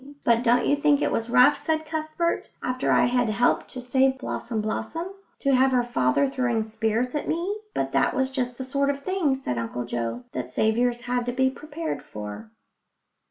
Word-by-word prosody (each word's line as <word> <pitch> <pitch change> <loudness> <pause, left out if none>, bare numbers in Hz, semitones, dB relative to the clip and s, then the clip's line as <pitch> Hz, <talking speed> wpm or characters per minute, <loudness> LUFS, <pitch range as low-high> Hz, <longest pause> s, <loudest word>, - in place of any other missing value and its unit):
"But 235 0 +3
don't 245 0 +3
you 285 - +3
think 290 0 +3
it - - 0
was 225 +1 -1
rough," 250 +5 +6
said 315 -1 -1
Cuthbert, 315 +2 -2
"after 255 0 0
I - - +5
had 245 -1 +1
helped 230 +3 +2
to 255 - -8
save 265 +1 +2
Blossom 235 -3 -4
blossom, 225 - -3 0.3
to 275 -1 +2
have 260 +1 +5
her 250 -1 +3
father 240 - +2
throwing 250 -4 0
spears 225 +3 -1
at 295 - -2
me?" 360 +6 -1 0.2
But - - -1
that - - +2
was 265 0 0
just 250 -2 -2
the 260 - -4
sort 280 +2 0
of 280 0 -2
thing, 370 -8 +1
said 195 - -3
Uncle 120 +1 -4
Joe, 120 0 -3
that 125 -1 -4
saviours 235 - +1
had 245 0 -2
to - - +1
be 260 +1 +2
prepared 305 +3 -5
for. 105 +1 -8
250 Hz, 195 wpm, -25 LUFS, 225-280 Hz, 0.3 s, rough